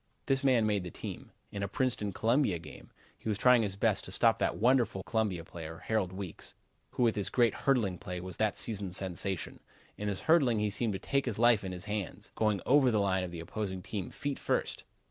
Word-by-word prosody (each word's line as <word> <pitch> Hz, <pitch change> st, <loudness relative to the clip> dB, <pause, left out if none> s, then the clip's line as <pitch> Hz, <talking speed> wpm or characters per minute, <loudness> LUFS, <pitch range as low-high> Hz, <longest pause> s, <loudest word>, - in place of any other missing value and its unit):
This 135 Hz, 0 st, +1 dB
man 125 Hz, -5 st, +4 dB
made 105 Hz, -3 st, +1 dB
the 90 Hz, -, -5 dB
team. -, -, -8 dB, 0.2 s
In 100 Hz, -, -5 dB
a 100 Hz, -, 0 dB
Princeton 105 Hz, -1 st, 0 dB
Columbia 115 Hz, -1 st, +2 dB
game 85 Hz, -, -12 dB, 0.3 s
he -, -, -4 dB
was 105 Hz, -, 0 dB
trying 125 Hz, 0 st, +6 dB
his 100 Hz, -3 st, -2 dB
best -, -, +1 dB
to -, -, -7 dB
stop -, -, +3 dB
that -, -, 0 dB
wonderful 120 Hz, -5 st, +2 dB
Columbia 105 Hz, -7 st, -1 dB
player, 80 Hz, -1 st, -9 dB
Harold 105 Hz, -5 st, 0 dB
Weekes, 95 Hz, -2 st, -8 dB, 0.4 s
who -, -, +1 dB
with 115 Hz, -1 st, +3 dB
his 100 Hz, -3 st, 0 dB
great 120 Hz, -2 st, +3 dB
hurdling 110 Hz, -10 st, +1 dB
play 90 Hz, 0 st, -5 dB
was 90 Hz, 0 st, -6 dB
that 110 Hz, -1 st, +1 dB
season's 100 Hz, -5 st, -1 dB
sensation. 95 Hz, 0 st, -4 dB, 0.4 s
In 105 Hz, -, -2 dB
his 100 Hz, -2 st, -2 dB
hurdling 140 Hz, -8 st, +4 dB
he 105 Hz, 0 st, 0 dB
seemed 110 Hz, +2 st, 0 dB
to -, -, -2 dB
take 140 Hz, -1 st, 0 dB
his 115 Hz, -, -1 dB
life 115 Hz, -2 st, +5 dB
in 95 Hz, -, -4 dB
his 90 Hz, +1 st, -7 dB
hands, 105 Hz, -3 st, -4 dB
going 105 Hz, -3 st, +1 dB
over 135 Hz, -1 st, +5 dB
the 110 Hz, -, +2 dB
line 95 Hz, -2 st, +1 dB
of 90 Hz, -, -4 dB
the 85 Hz, -1 st, -7 dB
opposing 95 Hz, +1 st, -4 dB
team 100 Hz, -2 st, -4 dB
feet 140 Hz, -1 st, -4 dB
first. -, -, -1 dB
105 Hz, 220 wpm, -31 LUFS, 95-120 Hz, 0.4 s, trying